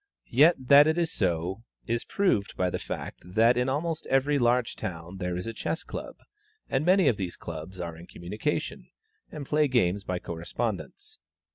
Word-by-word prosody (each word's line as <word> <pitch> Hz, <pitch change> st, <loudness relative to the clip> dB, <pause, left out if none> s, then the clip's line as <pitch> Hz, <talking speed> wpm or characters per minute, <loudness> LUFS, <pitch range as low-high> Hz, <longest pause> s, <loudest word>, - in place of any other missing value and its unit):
Yet 150 Hz, +8 st, +6 dB
that 140 Hz, +3 st, +7 dB
it 160 Hz, +1 st, +2 dB
is 170 Hz, -2 st, +1 dB
so 90 Hz, +1 st, -1 dB, 0.2 s
is 115 Hz, 0 st, -1 dB
proved 180 Hz, -, 0 dB
by 90 Hz, -1 st, +1 dB
the -, -, -2 dB
fact -, -, -6 dB
that 110 Hz, +7 st, +3 dB
in 125 Hz, +1 st, +1 dB
almost 155 Hz, +4 st, -2 dB
every 140 Hz, +2 st, +2 dB
large 120 Hz, 0 st, +2 dB
town 85 Hz, +1 st, -6 dB
there 90 Hz, -1 st, -2 dB
is 90 Hz, -, -4 dB
a 115 Hz, -, -4 dB
Chess 160 Hz, -, -3 dB
Club, -, -, -7 dB, 0.5 s
and 135 Hz, -, 0 dB
many 185 Hz, 0 st, +4 dB
of 115 Hz, -, +3 dB
these 90 Hz, -3 st, -4 dB
clubs 85 Hz, +3 st, -8 dB
are 85 Hz, -2 st, -4 dB
in 85 Hz, +2 st, -12 dB
communication, 90 Hz, +5 st, -3 dB, 0.4 s
and 145 Hz, -2 st, -6 dB
play 150 Hz, +2 st, +2 dB
games 100 Hz, -7 st, +1 dB
by 90 Hz, -1 st, -2 dB
correspondence. 110 Hz, -, -5 dB
115 Hz, 175 wpm, -28 LUFS, 90-145 Hz, 0.5 s, that